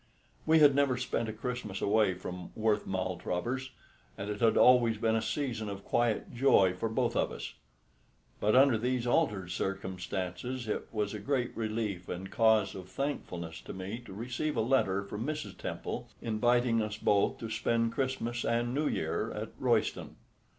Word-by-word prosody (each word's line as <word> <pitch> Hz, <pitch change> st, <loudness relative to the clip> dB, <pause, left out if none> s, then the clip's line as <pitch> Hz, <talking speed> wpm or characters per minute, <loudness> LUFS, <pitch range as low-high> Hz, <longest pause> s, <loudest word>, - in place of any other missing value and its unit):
We 160 Hz, +1 st, +6 dB
had 145 Hz, -3 st, +7 dB
never 140 Hz, -2 st, +2 dB
spent 115 Hz, -2 st, -1 dB
a -, -, -1 dB
Christmas 110 Hz, -3 st, -4 dB
away 105 Hz, -2 st, +3 dB
from 90 Hz, 0 st, -7 dB
Worth 110 Hz, -1 st, +1 dB
Maltravers, 95 Hz, +7 st, -2 dB, 0.5 s
and 100 Hz, +1 st, -4 dB
it 105 Hz, -, -5 dB
had 115 Hz, -1 st, +4 dB
always 120 Hz, -3 st, +6 dB
been 110 Hz, +1 st, +1 dB
a 110 Hz, -, +1 dB
season 110 Hz, -2 st, -2 dB
of 100 Hz, 0 st, -7 dB
quiet 120 Hz, -2 st, 0 dB
joy 120 Hz, -7 st, +4 dB
for 100 Hz, +5 st, -2 dB
both 110 Hz, -, 0 dB
of -, -, +1 dB
us. -, -, -6 dB, 0.9 s
But 105 Hz, +2 st, +2 dB
under 130 Hz, -3 st, +6 dB
these 125 Hz, +1 st, 0 dB
altered 100 Hz, -6 st, +1 dB
circumstances 95 Hz, +6 st, -3 dB
it 105 Hz, -, -2 dB
was 105 Hz, -2 st, -1 dB
a 105 Hz, -, -4 dB
great 125 Hz, +3 st, -1 dB
relief 110 Hz, -5 st, -3 dB
and 95 Hz, +2 st, -5 dB
cause 110 Hz, -3 st, +3 dB
of 95 Hz, -1 st, -9 dB
thankfulness 90 Hz, -, -4 dB
to -, -, -8 dB
me 95 Hz, +5 st, -5 dB
to -, -, -9 dB
receive 120 Hz, +9 st, -3 dB
a -, -, +3 dB
letter 110 Hz, -6 st, +2 dB
from 105 Hz, +2 st, -5 dB
Mrs. 155 Hz, +3 st, -4 dB
Temple -, -, -5 dB
inviting 120 Hz, +1 st, +2 dB
us 105 Hz, 0 st, -3 dB
both 100 Hz, -2 st, +2 dB
to 115 Hz, -1 st, -6 dB
spend 115 Hz, +1 st, +1 dB
Christmas 120 Hz, -2 st, -2 dB
and 120 Hz, +1 st, 0 dB
New 150 Hz, +2 st, +1 dB
Year 80 Hz, 0 st, -1 dB
at -, -, -5 dB
Royston. -, -, 0 dB
110 Hz, 170 wpm, -31 LUFS, 100-125 Hz, 0.9 s, had